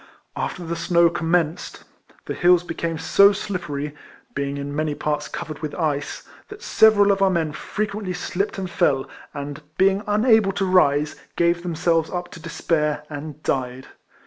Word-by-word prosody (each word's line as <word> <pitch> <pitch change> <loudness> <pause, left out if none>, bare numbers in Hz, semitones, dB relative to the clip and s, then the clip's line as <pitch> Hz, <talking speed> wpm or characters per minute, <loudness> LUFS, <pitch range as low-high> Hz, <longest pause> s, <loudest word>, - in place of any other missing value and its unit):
After 175 - -4
the 170 +1 -3
snow 170 0 +3
commenced, 170 -1 -1 0.4
the - - -3
hills 175 0 +4
became 165 -1 -3
so 200 +4 +5
slippery 150 -8 -4 0.4
(being 140 0 -2
in 140 0 -5
many 155 -1 -1
parts 150 0 -2
covered 150 +1 -6
with 155 -2 -5
ice), 150 -4 -2 0.3
that 420 +2 -10
several 210 - +5
of 195 0 0
our 195 - +5
men 165 -4 0
frequently 205 +3 -4
slipped 180 +3 -3
and 190 -1 -3
fell, 145 -7 +1 0.2
and 145 +1 -6 0.2
being 195 +1 +3
unable 215 -1 +4
to 195 0 0
rise, 150 -5 +3 0.2
gave 170 0 +2
themselves 165 -1 0
up 175 -1 -5
to - - -10
despair, 150 -2 -1
and 150 +1 -7
died. 130 0 -2
170 Hz, 155 wpm, -22 LUFS, 150-185 Hz, 0.4 s, so